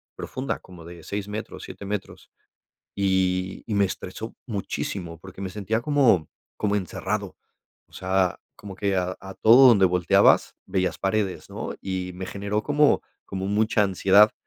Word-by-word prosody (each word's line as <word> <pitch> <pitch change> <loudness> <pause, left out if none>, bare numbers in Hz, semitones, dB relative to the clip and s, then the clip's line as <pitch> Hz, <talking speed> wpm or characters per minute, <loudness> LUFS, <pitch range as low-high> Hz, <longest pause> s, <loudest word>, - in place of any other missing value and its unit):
profunda, 130 +1 -4
como 90 -3 -14
de 85 -1 -11
6 100 +4 -4
metros, 105 +1 -6
7 100 - -9
metros, 100 0 -6 0.6
y 95 -1 0
y 110 - -2
me 100 - +4
estresó 95 +3 -5
muchísimo, 95 -5 -4
porque 95 +1 -12
me 95 - -3
sentía 105 +3 -1
como 120 - +3 0.3
como 105 -1 0
encerrado. 95 -4 -3 0.5
O - - -33
sea, 95 -1 0 0.2
como 100 -2 -9
que 100 0 0
a 90 0 -1
a 95 0 -9
todo 125 +4 +7
donde 100 -5 +6
volteabas 90 -1 +4
veías 90 -2 -1
paredes, 100 -1 -1
¿no?, - - -5
y 95 -1 -3
me 95 +1 -6
generó 100 +2 -3
como 150 0 +4 0.3
como 95 0 -4
mucha 105 +1 +2
ansiedad. 100 +2 +5
95 Hz, 155 wpm, -25 LUFS, 95-105 Hz, 0.6 s, todo